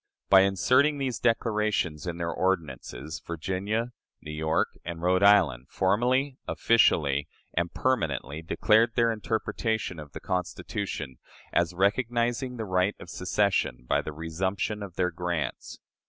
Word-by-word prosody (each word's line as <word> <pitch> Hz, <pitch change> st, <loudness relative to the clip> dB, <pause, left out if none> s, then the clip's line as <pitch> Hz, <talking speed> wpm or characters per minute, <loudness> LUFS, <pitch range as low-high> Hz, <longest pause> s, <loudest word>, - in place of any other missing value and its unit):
By 95 Hz, -1 st, +9 dB
inserting 125 Hz, -, +3 dB
these 130 Hz, -4 st, -2 dB
declarations 105 Hz, -8 st, 0 dB
in 85 Hz, -1 st, -3 dB
their 85 Hz, -1 st, -2 dB
ordinances, 80 Hz, -5 st, -2 dB
Virginia, 95 Hz, +8 st, -2 dB, 0.3 s
New 75 Hz, -, -8 dB
York, 80 Hz, +1 st, 0 dB
and 85 Hz, -1 st, -5 dB
Rhode 90 Hz, +2 st, +2 dB
Island, 85 Hz, -12 st, +4 dB
formally, 125 Hz, +8 st, +1 dB
officially, 75 Hz, -11 st, +3 dB, 0.3 s
and 85 Hz, +1 st, -1 dB
permanently, 80 Hz, -, -1 dB
declared 110 Hz, +7 st, +3 dB
their 115 Hz, -1 st, +3 dB
interpretation 110 Hz, -3 st, -2 dB
of 75 Hz, -3 st, -10 dB
the -, -, -6 dB
Constitution 90 Hz, -, -4 dB, 0.3 s
as 85 Hz, 0 st, +1 dB
recognizing 120 Hz, +5 st, 0 dB
the 110 Hz, -, -3 dB
right 95 Hz, +1 st, +1 dB
of 90 Hz, -, -10 dB
secession 95 Hz, -9 st, 0 dB
by -, -, +2 dB
the -, -, -6 dB
resumption 95 Hz, +7 st, -2 dB
of 95 Hz, -4 st, -7 dB
their 90 Hz, -1 st, +1 dB
grants. 85 Hz, -2 st, -3 dB
95 Hz, 130 wpm, -27 LUFS, 80-110 Hz, 0.3 s, By